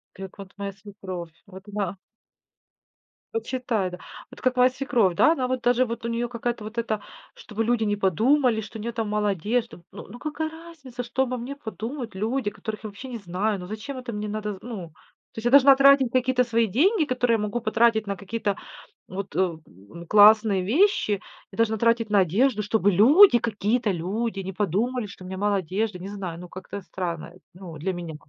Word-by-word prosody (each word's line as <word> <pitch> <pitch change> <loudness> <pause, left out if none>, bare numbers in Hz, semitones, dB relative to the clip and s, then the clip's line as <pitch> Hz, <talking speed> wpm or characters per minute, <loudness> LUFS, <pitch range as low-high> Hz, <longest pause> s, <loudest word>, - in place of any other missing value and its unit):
Ты, 195 - -7
э, - - -6
к - - -25
вот 195 -1 -10
моя 200 -1 -4
свекровь, 190 -4 -8
вот 190 0 -12
она 200 -2 -2 1.4
Вот 455 - -2
считай, 230 -7 -1
да. 180 - -8 0.3
Вот - - -13
как 255 -1 +1
моя 250 0 +5
свекровь, 240 -9 +1
да? 315 - +5
Она 255 -5 -1
вот 255 -1 -1
даже, 245 +1 +3
вот 230 0 -6
у - - -1
неё 235 +1 -1
какая-то 240 -1 -3
вот 220 +2 -8
эта, 220 -2 -1 0.3
чтобы 225 +1 -4
люди 240 0 +1
не 205 -1 +1
подумали, 225 - +2
что 220 +2 -9
у - - -7
неё 235 +1 -3
там 225 -2 -3
мало 210 0 0
одежды. 210 +2 -2
Ну, - - -9
ну 240 +4 -10
какая 310 +1 -3
разница, 315 -7 -9
что 245 +2 -1
обо 255 0 -3
мне 255 +4 -6
подумают 235 -1 -6
люди, 220 +3 -1
которых 215 +1 -7
я - - -3
вообще 250 +6 -10
не 240 -2 -5
знаю? 200 +2 -2
Ну 180 - -7
зачем 220 +8 -6
это 250 -2 -6
мне 210 0 -4
надо 210 0 -3
зн - - -11 0.2
Ну, 180 -5 -7 0.4
то - - -12
есть 225 - -6
я - - +4
должна 275 0 +8
тратить 275 -2 +5
какие-то 255 0 +2
свои 230 -1 +1
деньги, 315 - +3
которые 250 -2 +1
я - - +2
могу 210 +3 -2
потратить 220 -1 +2
на 200 - -2
какие-то, 200 +1 -2 0.5
вот, 195 +1 -6
э, - - -2
м, 170 -4 0
ну, 100 - -13
классные 210 -1 +6
вещи. 225 - +2 0.3
Я - - -11
должна 225 -1 +2
тратить 230 0 +2
на 205 -2 +5
одежду, 210 - +2
чтобы 205 -1 +2
люди, 260 - +7
какие-то 220 0 0
люди 195 +6 -2
не 190 - -5
подумали, 210 +6 -1
что 195 -2 -12
у - - -9
меня 190 0 -6
мало 205 0 +1
одежды. 190 +2 -2
Не 190 - -6
знаю. 190 -5 -6
Ну, 180 0 -9
как-то 190 +2 -8
странно, 170 -3 -5
эт 185 - -19
ну, 175 -4 -10
для 185 +5 -2
меня. 170 -3 -6
220 Hz, 215 wpm, -25 LUFS, 195-245 Hz, 1.4 s, должна